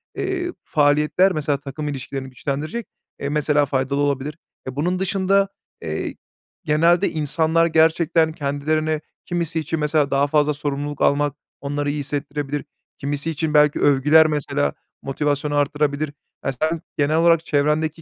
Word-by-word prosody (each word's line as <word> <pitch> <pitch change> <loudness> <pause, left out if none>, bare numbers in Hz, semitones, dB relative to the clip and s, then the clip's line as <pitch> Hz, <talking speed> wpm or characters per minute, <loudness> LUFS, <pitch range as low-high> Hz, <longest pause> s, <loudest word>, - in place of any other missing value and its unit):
eee, 365 -2 -2
faaliyetler, 150 +6 +3
mesela 150 -3 0
takım 145 +2 -6
ilişkilerini 135 -1 -5
güçlendirecek, 150 - -4 0.3
eee, 140 - -3
mesela, 150 0 +2
faydalı 140 0 -1
olabilir. 145 +2 -1 0.3
Eee, 130 - -5
bunun 180 +6 0
dışında, 195 +1 +2 0.3
eee, - - -4 0.5
genelde 170 +4 +3
insanlar 160 +2 +2
gerçekten 160 0 +3
kendilerini 155 +2 -1 0.2
kimisi 170 -2 -2
için 160 +1 -3
mesela 150 -1 +1
daha 140 +1 +3
fazla 150 0 +2
sorumluluk 145 0 -4
almak 145 0 +2 0.3
onları 145 +1 -2
iyi 145 +1 -2
hissettirebilir, 145 0 -3 0.3
kimisi 145 +3 -2
için 155 0 -2
belki 150 -1 +4
övgüler 150 +3 +5
mesela, 145 -1 -1 0.3
motivasyonu 145 +1 -1
artırabilir. 145 0 0 0.3
Ya, 135 - +1
sen 155 +5 -1 0.2
genel 150 +2 +2
olarak 165 -1 +4
çevrendeki 150 +2 0
150 Hz, 135 wpm, -22 LUFS, 145-160 Hz, 0.5 s, övgüler